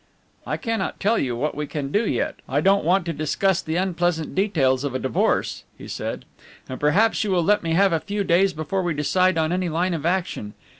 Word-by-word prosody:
"I - - -1
cannot 225 -4 -3
tell 220 +3 +2
you 125 -3 -1
what 145 +6 -1
we 150 0 -4
can 140 -3 -4
do 210 +5 +1
yet. 120 - -1
I 135 +3 +1
don't 195 +5 +3
want 180 +3 +2
to 170 - -2
discuss 170 +5 0
the 160 - -4
unpleasant 175 -3 0
details 145 -10 +1
of 140 -3 -3
a - - 0
divorce," 130 - 0
he - - -10
said, - - -5 0.4
"and 130 - -6
perhaps 200 +12 +3
you 210 - -2
will 180 -3 +2
let 210 +4 +3
me 165 -1 -1
have 195 +1 +4
a 165 - +2
few 205 +3 -3
days 190 +2 +3
before 175 +4 -2
we 175 -3 -1
decide 180 +4 +2
on 160 0 +1
any 180 0 0
line 175 +3 0
of 160 -4 -3
action. 170 - -2
170 Hz, 220 wpm, -23 LUFS, 150-190 Hz, 0.4 s, have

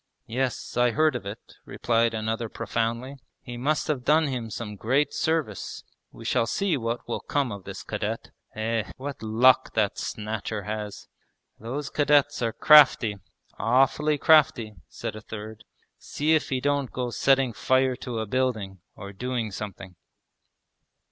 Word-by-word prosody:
...' - - -53
'Yes, 125 0 -3
I 120 0 +4
heard 155 +3 +2
of 110 -5 -5
it,' 105 +3 -10
replied 115 -1 0
another 110 +1 -2
profoundly, 115 +5 -3 0.3
'he 120 - -7
must 145 +6 0
have 140 -5 -1
done 155 +4 +4
him 125 -5 -3
some 105 -1 -6
great 130 +9 +1
service. 155 - -2 0.3
We - - -12
shall 115 - +1
see 190 - 0
what 115 -2 -3
will 120 - -2
come 140 -4 -1
of 100 -2 -8
this 95 0 -7
cadet. 110 +1 -4 0.2
Eh! 110 -2 -2
what 140 +1 -6
luck 115 +4 +3
that 105 -3 +1
Snatcher 110 -1 -4
has!' 105 0 -5 0.5
'Those 135 +6 -5
cadets 145 -1 +3
are 115 -1 +1
crafty, 130 -7 +6 0.4
awfully 135 +5 +2
crafty,' 135 -8 +4
said - - -6
a 110 - -8
third. 110 0 -9 0.3
'See 155 +2 0
if 155 - +1
he 130 - 0
don't 140 -1 0
go 125 -1 -3
setting 130 +1 +2
fire 130 +3 +2
to 125 -2 -5
a 110 - -1
building, 110 -5 -1 0.2
or 100 +1 -9
doing 120 +1 -3
something!' 95 -2 -7
120 Hz, 155 wpm, -26 LUFS, 110-135 Hz, 0.5 s, crafty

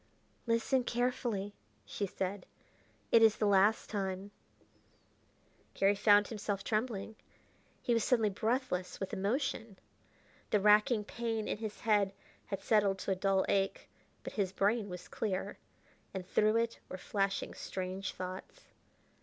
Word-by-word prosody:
"Listen 230 +3 +2
carefully," 240 -5 -1 0.3
she 200 - -3
said; 190 +1 -4 0.6
"it 230 - +7
is 220 -2 +6
the 215 - +1
last 205 +2 +4
time 195 -1 -3 0.7
" - - -36
Garry 195 +1 +4
found 205 0 +5
himself 205 -3 -3
trembling; 220 -1 -2 0.7
he 240 - +2
was 230 -2 +2
suddenly 225 -5 +2
breathless 215 -3 -1
with 195 - -4
emotion. 225 0 -1 0.7
The 210 - +3
racking 210 +3 +5
pain 225 0 -3
in - - -2
his 220 -2 -6
head 205 -3 +2 0.3
had 195 - -4
settled 205 -3 +3
to 195 - -3
a - - +2
dull 190 0 +2
ache, 195 -1 0 0.3
but - - -6
his 195 -3 0
brain 205 +2 +1
was 180 0 -8
clear, 195 -4 -3 0.6
and 185 -1 -4
through 215 +2 +3
it 230 0 -1
were 185 - -5
flashing 195 +1 -1
strange 190 +1 -4
thoughts. 185 - -7
205 Hz, 135 wpm, -33 LUFS, 195-225 Hz, 0.7 s, it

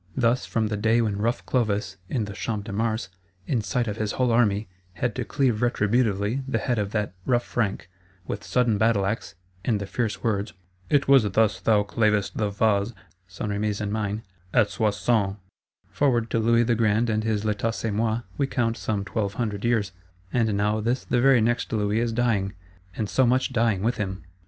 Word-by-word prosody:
Thus 125 0 +2
from 115 -1 0
the 105 - -2
day 110 +3 +3
when 105 -3 0
rough 115 +4 -1
Clovis, 105 -6 0
in 115 -1 -1
the 100 - -7
Champ 105 +1 -3
de 105 - -6
Mars, 110 -2 -1 0.4
in 120 -2 0
sight 120 +2 -1
of 105 0 -3
his 110 -2 -2
whole 125 -2 +1
army, 110 -3 +2 0.3
had 120 +6 -1
to - - -3
cleave 130 -6 +1
retributively 115 0 +1
the 125 - 0
head 115 +1 -1
of 100 -1 -1
that 105 -3 -1
rough 120 +3 +2
Frank, 105 -7 -2 0.4
with - - -5
sudden 120 -5 +1
battleaxe, 105 -2 +1 0.3
and 110 -5 +1
the 100 - -4
fierce 110 0 -2
words, 105 -2 -1 0.4
'It 140 -1 +3
was 135 -6 +6
thus 110 +1 +2
thou 105 -2 +3
clavest 105 -2 +1
the 105 -2 0
vase' 100 +1 +1 0.3
(St. 95 +3 -5
Remi's 105 0 -1
and 105 -1 -2
mine) 105 0 -2 0.3
'at 105 - +4
Soissons,' 105 -2 +1 0.6
forward 120 -5 +1
to 115 - +2
Louis 115 +1 +4
the 120 0 +2
Grand 115 0 +2
and 110 -1 0
his 110 -1 -1
L'Etat 105 +1 0
c'est 115 - -2
moi, 110 +2 0 0.2
we 140 - +2
count 115 -3 0
some 100 -2 -2
twelve 100 -1 -2
hundred 105 -4 -2
years: 110 -4 +1 0.4
and 115 -3 +2
now 105 +1 +1
this 120 +4 -1
the 120 - +1
very 135 -2 +5
next 120 +2 0
Louis 105 -1 +1
is 120 0 0
dying, 110 -5 0 0.4
and 110 - -2
so 130 +4 +3
much 130 +2 +1
dying 115 -5 +1
with 120 +3 +1
him! 95 -4 -4
110 Hz, 195 wpm, -25 LUFS, 105-120 Hz, 0.6 s, was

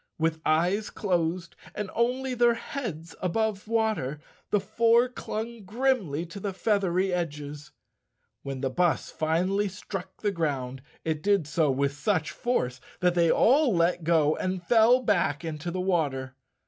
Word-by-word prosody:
With 160 0 0
eyes 175 +7 +2
closed, 175 -3 -1 0.2
and 210 -2 -4
only 255 +3 0
their 240 -1 +4
heads 185 - -6
above 210 +2 -1
water, 220 - 0 0.3
the 205 - +3
four 230 +4 +3
clung 230 -2 -6
grimly 205 - 0
to 175 +4 -9
the 200 0 -3
feathery 190 -2 +1
edges. 150 -4 -4 0.7
When 135 -1 -5
the 135 -1 -1
bus 175 +3 +1
finally 185 +6 +1
struck 190 0 -7
the 205 - +2
ground 135 -7 -2 0.2
it 155 -2 -1
did 200 -3 +2
so 155 0 +1
with 140 +1 +1
such 160 +1 0
force 130 - -1 0.2
that 180 -1 +3
they 170 -1 +3
all 260 - +4
let 170 0 +2
go 155 -2 +3
and 185 -1 -3
fell 240 +4 +5
back 170 - +1
into 155 +1 -4
the 185 +2 -3
water. 145 -8 0
180 Hz, 150 wpm, -27 LUFS, 155-215 Hz, 0.7 s, fell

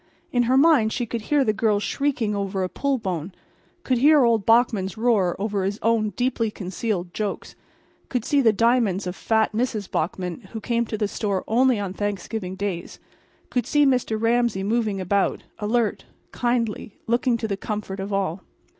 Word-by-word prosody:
In 245 - +2
her 260 - +4
mind 275 -7 +5
she 245 - -1
could 230 0 -4
hear 285 +5 +2
the 215 -4 +1
girls 210 -1 +1
shrieking 250 -2 -1
over 195 -1 -2
a 185 - -2
pull 280 +5 -1
bone, 185 -5 -4 0.5
could 255 -2 +1
hear 295 +1 +6
old 225 -4 +2
Bachman's 225 -4 +3
roar 220 -6 +2
over 200 -1 -1
his 200 +2 -1
own 225 -2 +2
deeply 245 -3 0
concealed 185 -2 -4
jokes, 210 -2 -4 0.5
could 250 -4 -2
see 285 -2 +3
the 230 -4 +5
diamonds 225 -3 +2
of 180 0 -4
fat 220 +1 +1
Mrs. 220 -3 -2
Bachman, 180 +2 -2
who 220 - -4
came 235 +1 0
to 215 - -3
the 210 -1 0
store 200 -2 -2
only 250 +2 +3
on 195 -2 -3
Thanksgiving 200 -1 -3
days, 190 -3 -4 0.5
could 245 -3 0
see 295 -1 +4
Mr. 250 -5 +1
Ramsay 230 -3 +1
moving 215 -1 0
about, 195 +2 0 0.2
alert, 220 +1 0 0.3
kindly, 235 -4 -1
looking 235 +1 +1
to 220 - -3
the 200 - -1
comfort 200 -1 -5
of 195 +2 -4
all. 190 -2 -1
220 Hz, 175 wpm, -24 LUFS, 195-240 Hz, 0.5 s, hear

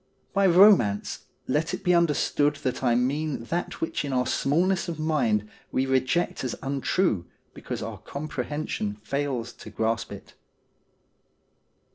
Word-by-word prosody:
By 195 -1 +4
romance, 175 - +5 0.2
let 150 +5 0
it - - -11
be 180 -2 +3
understood 150 -3 +2
that 130 0 -2
I 120 -2 +3
mean 140 +2 0
that 170 +9 -3
which 165 - -1
in 140 - -3
our 125 -1 +2
smallness 170 +8 +1
of 165 - -4
mind 120 -10 +1 0.2
we 130 - +1
reject 130 +7 +1
as 125 - -2
untrue 135 - 0 0.3
because - - -5
our - - -6
comprehension 140 -6 -4
fails 125 +2 -3
to - - -11
grasp 110 0 -1
it. - - -10
140 Hz, 135 wpm, -26 LUFS, 125-165 Hz, 0.3 s, romance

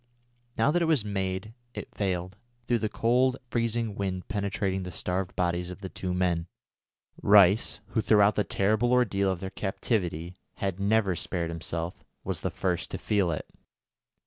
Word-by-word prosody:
Now 115 +6 +4
that 175 +2 +2
it - - +3
was 155 -9 +2
made 95 +1 -2 0.2
it - - -7
failed, 95 -1 -2 0.3
through 120 -1 +2
the 110 - -1
cold 125 +4 +2
freezing 115 -1 0
wind 95 -2 -3
penetrating 100 -2 -1
the 90 - -5
starved 90 +2 -2
bodies 90 0 0
of 90 +2 -9
the 95 - -5
two 90 0 -4
men. 90 -2 0 0.7
Rice, 100 +1 +5
who 110 - +1
throughout 105 -1 +5
the 105 - +1
terrible 110 +6 +1
ordeal 100 -6 +3
of 90 - -4
their 95 -1 -4
captivity 90 -4 -2 0.2
had 95 -1 -2
never 100 -2 +2
spared 85 0 -2
himself, 85 +1 -4 0.2
was - - -3
the - - -1
first 90 -3 -2
to - - -4
feel 100 -4 +1
it. 75 - -3
100 Hz, 165 wpm, -28 LUFS, 90-110 Hz, 0.7 s, Rice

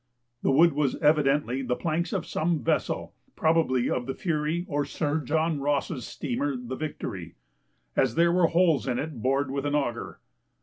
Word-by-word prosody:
The - - +1
wood 160 +4 +5
was 145 -2 +1
evidently 145 -4 +2
the 125 -1 -1
planks 165 +3 -1
of - - -2
some 165 -1 -1
vessel - - -1 0.2
(probably 155 -6 +2
of 125 0 -1
the 135 - -3
Fury 160 0 -1
or 145 -1 0
Sir 150 +2 -1
John 160 +1 0
Ross's 140 -2 -1
steamer 140 +1 -2
the 125 +1 -6
Victory) 105 - -5 0.6
as - - +2
there 170 +1 +4
were 175 -1 +4
holes 165 -5 +2
in 125 -2 0
it 145 -5 -4
bored 135 +2 +1
with 140 0 -2
an 145 0 0
auger. 120 -5 -2
145 Hz, 170 wpm, -27 LUFS, 135-160 Hz, 0.6 s, wood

